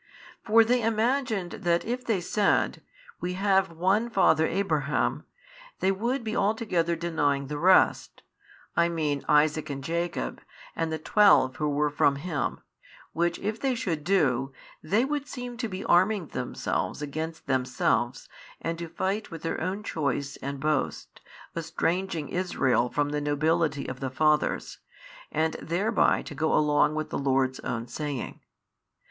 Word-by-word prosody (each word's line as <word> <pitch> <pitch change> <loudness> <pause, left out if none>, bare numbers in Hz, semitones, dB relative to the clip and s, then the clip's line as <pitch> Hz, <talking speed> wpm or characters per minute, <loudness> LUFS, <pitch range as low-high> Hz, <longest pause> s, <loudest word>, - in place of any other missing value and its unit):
For 225 +1 +6
they 245 +2 +2
imagined 225 -3 0
that 170 -1 +1
if 245 +2 -3
they 220 -7 0
said, 200 +3 +1 0.4
We 180 0 -3
have 195 -1 +2
one 190 +8 +1
father 190 -6 +3
Abraham, 155 -7 0 0.5
they 190 - +2
would 235 +6 -1
be 220 -1 -3
altogether 195 -6 +1
denying 150 -5 0
the 145 +2 -5
rest, 185 +3 +3 0.5
I 170 0 +3
mean 150 -4 -1
Isaac 150 +1 +3
and 140 -1 -5
Jacob, 165 - -3 0.3
and 165 -1 -1
the 160 - -1
twelve 150 -7 +4
who 150 -1 0
were 145 +1 +1
from 145 -1 +3
him, 145 -2 -3 0.5
which 170 +1 0
if 215 +2 -3
they 265 -2 +1
should 170 -11 -2
do, 135 -8 +2 0.3
they 210 +10 +2
would 290 0 -2
seem 245 -2 -6
to 235 -1 -2
be 190 -2 -6
arming 185 0 +3
themselves 125 +3 -3
against 155 +2 -5
themselves 130 -1 0 0.3
and 165 0 -3
to 170 -1 -5
fight 195 +5 -2
with 165 - -9
their 165 - -2
own 195 +3 -2
choice 140 - -2
and 140 0 -5
boast, 150 -1 -2 0.3
estranging 165 0 -1
Israel 130 -9 +1
from 145 +2 0
the 150 0 -2
nobility 145 0 +1
of 130 0 -6
the 135 - -3
fathers, 150 +3 +1 0.5
and 160 +1 0
thereby 195 +7 +1
to - - -8
go 160 +2 +1
along 150 0 +3
with 155 0 -3
the - - -2
Lord's 135 -1 +1
own 115 0 -3
saying. 140 +1 -5
165 Hz, 150 wpm, -27 LUFS, 145-195 Hz, 0.5 s, For